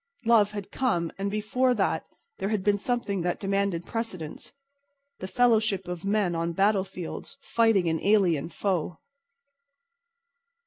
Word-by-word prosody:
Love 225 -3 +5
had 205 -2 -6
come, 175 -11 0
but 195 +1 -2
before 230 +5 +1
that 195 -4 0 0.3
there 195 - -1
had 215 -3 -1
been 205 0 +3
something 220 -5 -1
that 175 0 -1
demanded 195 -3 -1
precedence—the 275 - -8
fellowship 215 -5 +2
of 180 -1 -5
men 200 -3 +1
on 165 0 -1
battlefields 190 +1 -1
fighting 225 -6 +3
an 160 0 0
alien 185 -8 +3
foe. 175 -4 -2
200 Hz, 125 wpm, -27 LUFS, 180-225 Hz, 0.3 s, Love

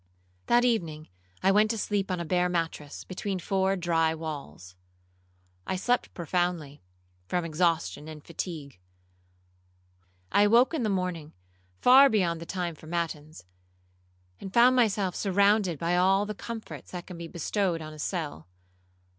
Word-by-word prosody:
'That 240 +1 +4
evening 165 -10 -1 0.3
I 190 - +5
went 210 +2 +4
to 225 - -1
sleep 205 -1 -1
on 180 -1 -1
a 170 - -3
bare 180 +2 +1
mattress, 165 -4 -3
between 190 +1 -4
four 190 +1 0
dry 165 -3 +1
walls. 140 - -7 0.9
I - - -1
slept 245 +7 0
profoundly, 170 -4 -2 0.5
from 175 - -1
exhaustion 165 -2 0
and 155 -2 -10
fatigue. 155 - -6 1.5
I - - +4
awoke 235 +8 +5
in 315 - -1
the 220 - 0
morning 180 -5 -2 0.5
far 270 +2 +8
beyond 175 -7 +1
the 170 - -8
time 180 -3 -3
for 155 - -15
matins, 160 - -4 0.9
and 195 - -7
found 245 +4 +6
myself 205 -6 +2
surrounded 200 -2 +2
by 170 +4 0
all 190 +3 +3
the 210 - -4
comforts 225 +2 -8
that 180 0 -6
can 180 -2 -9
be 170 - -6
bestowed 175 +1 -1
on 155 -1 -8
a 155 - -12
cell. 150 - -4
180 Hz, 145 wpm, -28 LUFS, 160-200 Hz, 1.5 s, far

